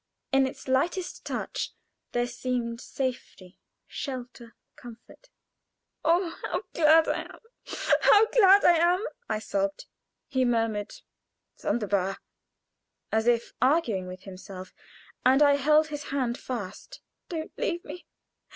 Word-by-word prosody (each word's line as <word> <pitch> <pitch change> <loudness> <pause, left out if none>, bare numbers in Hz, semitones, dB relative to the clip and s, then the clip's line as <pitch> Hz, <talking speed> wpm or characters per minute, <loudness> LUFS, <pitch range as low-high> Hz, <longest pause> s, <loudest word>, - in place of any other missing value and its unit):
In 270 -1 +4
its 265 - -9
lightest 340 +8 0
touch - - -4 0.4
there 240 0 +1
seemed 245 -1 -3
safety, 245 -8 -5 0.3
shelter, 245 -3 -7 0.2
comfort. 240 - -14 0.7
"Oh, 340 0 +2
how - - -3
glad 320 0 +5
I - - 0
am! - - -13 0.6
how 425 +1 +7
glad 400 -3 +6
I 345 -1 +7
am!" 355 +5 +2 0.2
I 215 - 0
sobbed. 195 -2 -2 0.4
He 260 -3 +1
murmured 225 -4 0 0.6
"Sonderbar!" 195 -4 -1 0.9
as 220 +1 +1
if 235 -1 +2
arguing 255 - +2
with 185 +1 -9
himself, 185 -1 -10 0.5
and 265 +3 +5
I 285 -1 +5
held 305 +2 +4
his 295 -1 -6
hand 255 -4 -1
fast. 220 -8 -7 0.3
"Don't 320 -2 -5
leave 345 0 -2
me! 355 - -9
255 Hz, 120 wpm, -27 LUFS, 220-315 Hz, 0.9 s, how